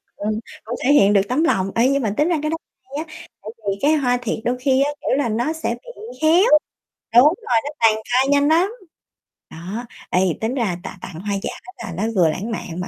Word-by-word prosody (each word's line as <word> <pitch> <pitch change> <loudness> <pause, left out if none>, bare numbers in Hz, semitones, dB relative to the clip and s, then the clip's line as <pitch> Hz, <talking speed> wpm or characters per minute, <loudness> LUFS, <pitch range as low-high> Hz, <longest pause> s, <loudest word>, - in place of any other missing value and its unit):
ừm, 215 +1 -2 0.2
cũng 235 +2 -4
thể 280 - +4
hiện 205 -8 +5
được 200 - +5
tấm 265 +6 +1
lòng. 195 - +1
Ê, 235 +2 +4
nhưng 275 0 +1
mà 210 -3 0
tính 300 - +3
ra 345 - +2
cái 305 - -1
đó 325 - -1 0.3
hay 285 +5 -6
á, 310 - -14 0.3
tại 210 - -8 0.2
vì 195 0 0
cái 295 +2 +4
hoa 250 -4 +1
thiệt 235 -2 -2
đôi 245 +1 0
khi 265 +1 +2
á, 290 - 0
kiểu - - 0
là, 280 -5 0
nó 240 +8 0
sẽ 320 - -3
bị - - -11
héo. 340 +7 +5 0.7
Đúng 240 - +9
rồi, 315 - +2
nó - - -2
tàn 225 -1 +5 0.2
phai 260 +2 +4
nhanh 285 0 +4
lắm. 345 +6 +3 0.8
Đó, 190 +9 -6 0.2
ê, 180 - +2 0.2
tính 220 +3 -1
ra 215 -9 -1
tạ - - -8
tặng 170 -4 -8
hoa 200 0 -2
giả - - -2 0.3
là 190 -6 -6
nó 195 - -1
vừa 175 -4 +4
lãng 200 +9 -4
mạn 180 -5 -5
mà 180 - -4
245 Hz, 240 wpm, -21 LUFS, 205-295 Hz, 0.8 s, Đúng